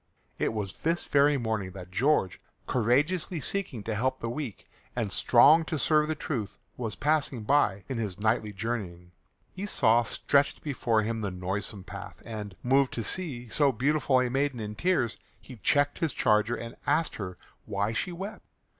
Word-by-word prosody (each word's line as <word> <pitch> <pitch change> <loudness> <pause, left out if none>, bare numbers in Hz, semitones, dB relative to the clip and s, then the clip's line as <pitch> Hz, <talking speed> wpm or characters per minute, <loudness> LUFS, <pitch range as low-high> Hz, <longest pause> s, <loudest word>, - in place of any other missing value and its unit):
It - - +1
was 105 -4 -4
this 165 +2 0
very 145 0 +4
morning 110 -6 -2
that 90 -2 -10
George, 95 - +1 0.2
courageously 150 - +1
seeking 145 - -2
to 110 - -3
help 130 +5 0
the 115 - -3
weak, 125 - -6 0.3
and 115 -5 -1
strong 145 +11 +6
to 160 - -2
serve 150 +1 +3
the 155 - -1
truth, 120 -8 -4 0.2
was 115 -4 -4
passing 145 -5 +1
by 105 -6 +2
in 130 -3 -3
his 105 -5 -3
knightly 110 0 +1
journeying. 95 -5 -4 0.4
He 195 +2 -5
saw 115 - +4
stretched 140 +4 +1
before 120 -6 +1
him 110 +1 -2
the 100 - -1
noisome 95 +2 -4
path, 100 +1 -9
and, 105 -4 -6
moved 135 +1 +3
to 115 - -3
see 125 - -2
so 140 +4 +3
beautiful 135 +2 +2
a 125 - +2
maiden 135 -1 0
in 105 -1 -4
tears, 130 - 0 0.2
he 130 - -12
checked 145 +6 +2
his 160 -4 0
charger 105 +2 +2
and 115 -1 -8
asked 160 0 +1
her 90 -3 -6 0.3
why 100 +3 -1
she 180 - -2
wept. 190 +5 -7
120 Hz, 170 wpm, -28 LUFS, 105-145 Hz, 0.4 s, strong